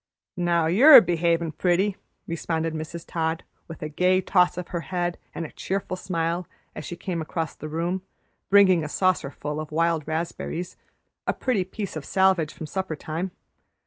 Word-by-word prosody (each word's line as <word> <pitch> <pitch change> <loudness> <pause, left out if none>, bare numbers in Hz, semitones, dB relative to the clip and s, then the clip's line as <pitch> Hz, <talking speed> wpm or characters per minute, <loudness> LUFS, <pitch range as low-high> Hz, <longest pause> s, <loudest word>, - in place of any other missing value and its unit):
"Now 170 -2 +2
you're 245 - +9
behavin' 170 -3 +1
pretty," 185 +5 +1 0.3
responded 165 -1 -2
Mrs. 160 +2 -6
Todd, 160 0 -2 0.2
with 165 -2 -8
a - - -2
gay 180 +4 +3
toss 180 -1 +2
of 180 - -5
her 170 - -2
head 175 0 -2 0.2
and 165 - -3
a - - -9
cheerful 195 -1 -3
smile, 170 -1 -2 0.3
as 155 - -6
she 175 - -5
came 170 -1 -4
across 160 0 -3
the 155 - -8
room, 170 +4 -2 0.5
bringing 190 -4 +6
a 150 - -4
saucerful 150 -4 -1
of 155 -1 -6
wild 165 -1 +1
raspberries, 165 +2 -3 0.5
a - - +2
pretty 235 -8 0
piece 195 0 -6
of 155 - -4
salvage 190 -3 +2
from 160 - -8
supper 190 +1 -3
time. 160 +5 -4
170 Hz, 165 wpm, -25 LUFS, 160-185 Hz, 0.5 s, you're